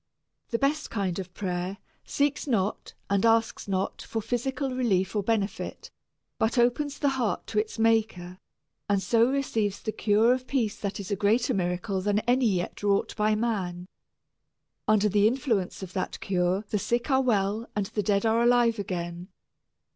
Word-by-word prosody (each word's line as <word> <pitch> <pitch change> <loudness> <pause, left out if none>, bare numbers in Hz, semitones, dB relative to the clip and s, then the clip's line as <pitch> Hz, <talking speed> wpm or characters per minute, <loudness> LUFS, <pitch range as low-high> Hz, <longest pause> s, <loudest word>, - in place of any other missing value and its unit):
The 230 - 0
best 290 +4 0
kind 195 -4 -2
of 185 -1 -6
prayer 180 0 -3 0.3
seeks 285 +1 0
not 210 -6 -1
and 200 -1 +1
asks 225 -1 +2
not 190 -1 -2
for 225 - -4
physical 260 +4 -2
relief 215 -7 +1
or 205 - +2
benefit, 205 -1 -2 0.5
but 220 +3 +1
opens 245 +4 +2
the 285 - +2
heart 255 -5 -1
to 215 - -1
its 215 +2 -3
maker, 220 -5 +1 0.5
and 200 -1 +3
so 230 +4 +3
receives 225 -7 -1
the 215 - -3
cure 220 +3 +3
of 255 0 -4
peace 235 -7 0
that 200 -1 -3
is 200 0 -6
a - - +2
greater 220 +6 +2
miracle 185 +1 -1
than 205 +1 +1
any 250 +1 +2
yet 180 -4 -2
wrought 200 -1 +1
by 215 0 +2
man. 190 -6 -2 1.0
Under 215 -1 +4
the 205 +1 +4
influence 225 -7 -1
of 185 -1 -8
that 185 - -3
cure 185 +2 0
the 210 - +1
sick 240 +7 -1
are 265 0 +4
well 215 -2 0
and 205 -1 0
the 210 - -2
dead 200 +1 +1
are 225 +1 +3
alive 240 -2 +3
again. 175 -2 -4
215 Hz, 170 wpm, -27 LUFS, 195-240 Hz, 1.0 s, Under